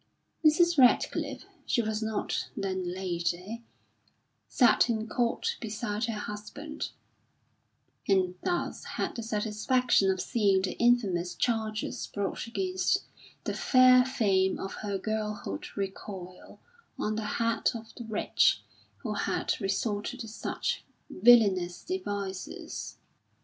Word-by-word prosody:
Mrs. 335 +1 +5
Radcliffe 250 +7 +3 0.2
(she 235 - +2
was 215 0 -2
not 220 -1 -2
then 185 -2 -2
Lady) 180 +4 -3 0.9
sat 245 -1 +4
in 220 -1 -1
court 235 +1 0
beside 215 0 -2
her 225 -2 -3
husband, 210 +9 -6 1.2
and 185 -2 +3
thus 350 -1 -1
had - - -3
the 235 - -4
satisfaction 220 0 +2
of 190 -1 +1
seeing 200 -4 +2
the 190 - -2
infamous 200 -8 +2
charges 220 0 -1
brought 200 +3 -3
against 370 +9 0 0.4
the - - -2
fair 255 -1 +6
fame 200 -8 +2
of 195 - -5
her 200 -2 -2
girlhood 210 - -3
recoil 190 -2 -6 0.4
on 215 0 -1
the 220 -1 -3
head 230 -1 +2
of 225 -1 -8
the 240 - -8
wretch 220 -1 +2 0.4
who - - -2
had - - 0
resorted 205 +5 -1
to 225 - -6
such 215 - -3 0.3
villainous 190 -5 +5
devices. 200 - -5
215 Hz, 115 wpm, -29 LUFS, 195-240 Hz, 1.2 s, fair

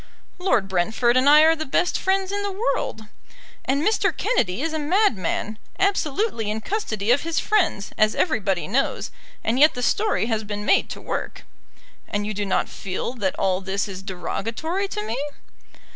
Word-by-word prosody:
"Lord 250 - +2
Brentford 220 +6 +1
and 260 +2 +5
I 300 +1 +8
are 320 +1 +6
the 315 - -3
best 345 +5 +1
friends 385 0 0
in 405 0 -1
the 405 0 -2
world." 385 - -2 0.6
"And 275 +3 +1
Mr. 435 - +2
Kennedy 230 - 0
is 325 -1 -1
a 315 - -1
madman, 290 - 0 0.2
absolutely 390 - 0
in 215 +1 -2
custody 225 - -1
of 265 - +4
his 330 0 -1
friends, 365 - +1
as 215 0 +4
everybody 195 - 0
knows; 255 +8 -1 0.3
and 235 +3 +1
yet 305 +2 +6
the 250 - -3
story 415 - +1
has 220 -2 -1
been 205 0 -5
made - - +3
to - - -6
work." - - -4 0.6
"And 205 0 -2
you 215 - -3
do 205 0 -3
not 190 - +1
feel 195 +5 -4
that 200 -7 -2
all 185 -1 +1
this 195 +2 -2
is 190 -2 -7
derogatory 225 - -3
to 210 - -4
me?" 220 +3 -3
240 Hz, 175 wpm, -23 LUFS, 205-335 Hz, 0.6 s, I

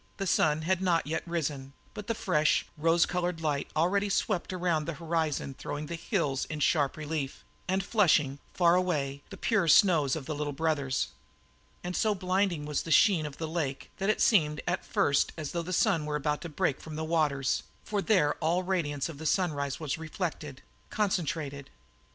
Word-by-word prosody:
The 195 - -2
sun 155 -3 +2
had 185 +2 +1
not 175 -3 +2
yet 155 +2 -2
risen, 145 -5 -3 0.2
but 210 -1 -8
the 230 - 0
fresh, 155 -7 +2
rose 165 +2 +3
coloured 180 -1 -2
light 150 -3 -1
already 195 +6 +2
swept 195 -2 0
around 175 -4 0
the 165 - -4
horizon 160 -4 -1
throwing 145 +3 -5
the 165 - -6
hills 165 - -1
in 155 - -5
sharp 145 -1 +2
relief 150 -3 -4 0.2
and 190 +1 0
flushing, 160 - +3
faraway, 170 -6 +1
the - - -9
pure 210 -7 +1
snows 155 -4 +5
of 155 -4 -5
the 155 - -3
Little 145 0 -3
Brothers. 140 -4 0 0.7
And 180 0 -4
so 215 -2 +2
blinding 185 -4 0
was 150 -1 -1
the - - -8
sheen 160 0 +4
of 140 - -10
the 160 - -3
lake 155 -5 -3
that 195 +2 0
it 215 - +1
seemed 150 -8 +3
at 175 +1 -1
first 145 -10 +1
as 155 -3 -4
though 170 - -2
the 175 +2 -6
sun 180 -6 +2
were 150 - -1
about 150 0 -1
to 170 - -6
break 145 -2 -1
from 155 -1 -8
the 160 - -3
waters, 150 -5 +1 0.2
for 205 -1 -1
there 185 -9 +3
all 170 +3 +1
the 180 - -9
radiance 145 -7 0
of 160 -4 -9
the 160 - -3
sunrise 145 -5 0
was 155 -1 -3
reflected, 155 -4 -5 0.3
concentrated. 155 -8 -2
160 Hz, 185 wpm, -29 LUFS, 150-180 Hz, 0.7 s, snows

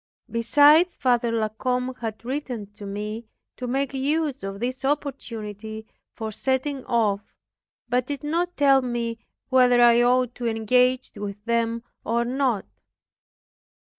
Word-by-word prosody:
Besides, 290 +9 +5
Father 240 -2 +1
La 220 -2 0
Combe 250 +3 -2
had 225 -1 -5
written 255 -5 -3
to 205 -1 -9
me, 210 +3 -5 0.3
to 250 - -5
make 270 +2 -1
use 285 +1 -1
of 195 0 -5
this 255 +3 -3
opportunity 220 -7 -4 0.3
for 220 -1 -4
setting 265 +4 -1
off, 220 -5 +1 0.7
but 250 0 0
did 285 -2 -5
not 345 +4 -1
tell 275 -2 +5
me 235 -2 -3 0.3
whether 250 -2 +5
I 240 0 +6
ought 250 0 +3
to 240 - 0
engage 250 +3 +2
with 205 0 -6
them 230 0 0 0.2
or 235 +1 0
not. 250 -4 0
245 Hz, 135 wpm, -24 LUFS, 225-265 Hz, 0.7 s, I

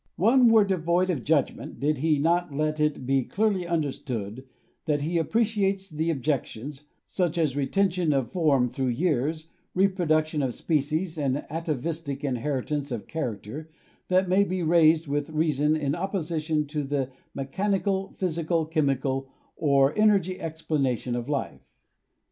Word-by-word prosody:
One 240 +5 +5
were 220 -2 +6
devoid 180 -1 +1
of 140 -9 -3
judgment 150 -3 0
did 150 0 0
he 155 +1 +2
not 170 +3 +1
let 155 +2 -1
it 150 -4 0
be 135 +1 +2
clearly; 195 - 0
understood 130 -8 -3 0.4
that 150 -3 +1
he 165 +3 0
appreciates 200 0 0
the 160 +2 -1
objections, 140 -1 -3 0.2
such 175 -2 -1
as 155 -5 +1
re 140 -2 0
tention 185 -2 +1
of 135 -4 0
form 145 -8 +3
through 130 +2 -2
years, 155 +3 0 0.3
reproduction 160 -5 +2
of 130 -3 -1
species 160 +2 -1
and 140 -1 -1
atavistic 155 -2 -3
inheritance 140 +2 -2
of 115 -4 -4
character, 135 0 -5 0.4
that 185 +1 +3
may 190 +2 +4
be 185 -2 -2
raised 160 -1 +4
with 145 +1 -1
xvi 160 - -12
INTRODUCTION - - -5 0.4
reason - - +2
in 145 -3 -1
opposition 165 -4 -1
to 150 +1 -3
the 135 -2 -2 0.2
mechanical, 195 +7 -1
physical, 165 -2 0
chemical 135 -4 0 0.3
or 140 -1 +3
energy 195 -4 +3
explanation 145 -7 -1
of 120 +2 -4
life. 145 -2 -3
155 Hz, 145 wpm, -26 LUFS, 140-175 Hz, 0.4 s, were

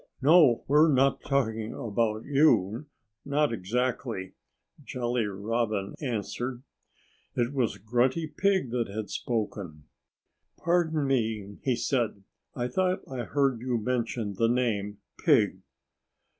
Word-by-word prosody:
No! 145 -4 +5
We're 150 +3 +5
not 135 0 +3
talking 115 -5 -1
about 110 0 -1
you 135 -4 +3 0.4
not 145 -1 +1
exactly!" 115 -1 -2 0.5
Jolly 120 -2 -1
Robin 105 0 -2
answered. 125 0 -3 0.7
It 120 +2 0
was 120 -7 0
Grunty 125 - +1
Pig 190 -4 0
that 120 -2 0
had 105 +1 -5
spoken. 100 -9 -3 0.7
"Pardon 160 -3 +1
me!" 110 -6 -1
he 130 -3 +1
said. 115 -4 -1 0.3
"I 120 -1 -1
thought 185 +8 0
I 125 -3 -4
heard 135 -3 +1
you 125 -1 0
mention 115 -2 -2
the 115 +4 +1
name, 105 -5 0 0.2
'Pig'." - - +3
120 Hz, 115 wpm, -28 LUFS, 110-135 Hz, 0.7 s, No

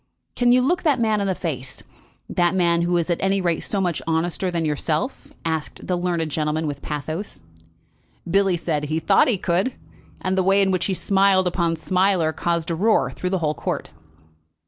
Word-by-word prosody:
"Can 245 -1 +3
you 250 +1 +5
look 350 +7 +1
that 290 -6 +2
man 220 -3 +1
in 200 - 0
the 190 - 0
face, 135 -8 -5 0.4
that 175 +1 +1
man 170 -2 +2
who 175 +1 +1
is 170 +1 0
at 170 - -1
any 195 +1 +2
rate 170 -3 0
so 200 - -2
much 175 -4 -1
honester 165 +3 0
than 170 -2 -1
yourself?" 155 - -2
asked 160 -2 -3
the 180 - 0
learned 175 -3 -1
gentleman 155 +1 -1
with 145 -2 -4
pathos. 155 +6 -5 0.8
Billy 195 0 +2
said 160 -3 -1
that 150 - -5
he 160 +1 0
thought 160 - +4
he 240 -6 +2
could, 185 +8 0 0.4
and 185 0 -1
the 190 - +2
way 195 +2 +3
in 190 - +1
which 185 -2 0
he 190 - 0
smiled 195 0 +3
upon 170 -2 0
Smiler 180 -1 +1
caused 170 -1 -1
a - - 0
roar 215 +6 +2
through 180 - -4
the 190 - 0
whole 150 - +1
court. - - -4
175 Hz, 200 wpm, -22 LUFS, 160-195 Hz, 0.8 s, you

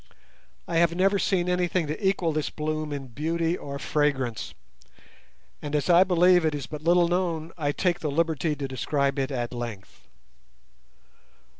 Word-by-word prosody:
I 170 - -1
have 170 0 +3
never 195 +2 +2
seen 180 -3 +1
anything 180 -1 +1
to 155 +7 -2
equal 175 -4 0
this 155 -1 -1
bloom 155 0 -3
in 140 -2 -5
beauty 165 +6 -1
or 140 -5 -6
fragrance, 135 -7 -1 1.1
and 145 0 -4
as 150 +3 +1
I 175 +2 +7
believe 180 -1 +4
it 155 -2 +1
is 140 -3 -4
but 150 -1 -8
little 170 +1 +4
known, 170 -2 -1
I 145 -4 -1
take 175 +3 0
the 155 - -2
liberty 160 0 0
to 140 -1 -4
describe 140 +2 -1
it 135 0 -1
at 120 -3 -3
length. 115 -5 -8
155 Hz, 160 wpm, -26 LUFS, 140-175 Hz, 1.1 s, I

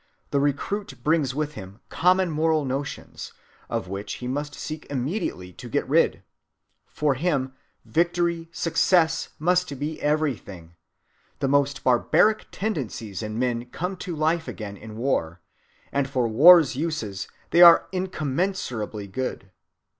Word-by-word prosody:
The 140 - +2
recruit 145 +4 -2
brings 150 -4 +1
with 150 0 -2
him 100 -3 -10
common 180 0 +2
moral 155 -1 +1
notions, 135 +1 -5 0.4
of - - -3
which 100 +2 -5
he 125 - -6
must 145 +3 -3
seek 155 0 -7
immediately 130 - -3
to - - -10
get - - -1
rid. - - +2 0.6
For 150 -2 0
him 135 -3 -1 0.3
victory, 170 0 0
success, 165 -1 +2
must 180 -2 +1
be 150 +3 -4
everything. 125 - -2 0.6
The 135 - -1
most 140 -1 +1
barbaric 165 - +3
tendencies 125 - -4
in 110 0 -5
men 120 -1 -1
come 180 +9 -4
to 175 -3 -5
life 160 +2 0
again 105 -3 -6
in 110 +2 -10
war, 95 -10 -1 0.5
and 140 -1 0
for 130 -4 0
war's 150 +5 +7
uses 130 -11 -3 0.2
they 170 - +5
are 170 -1 +9
incommensurably 155 - -2
good." 100 -2 -5
145 Hz, 130 wpm, -25 LUFS, 120-165 Hz, 0.6 s, are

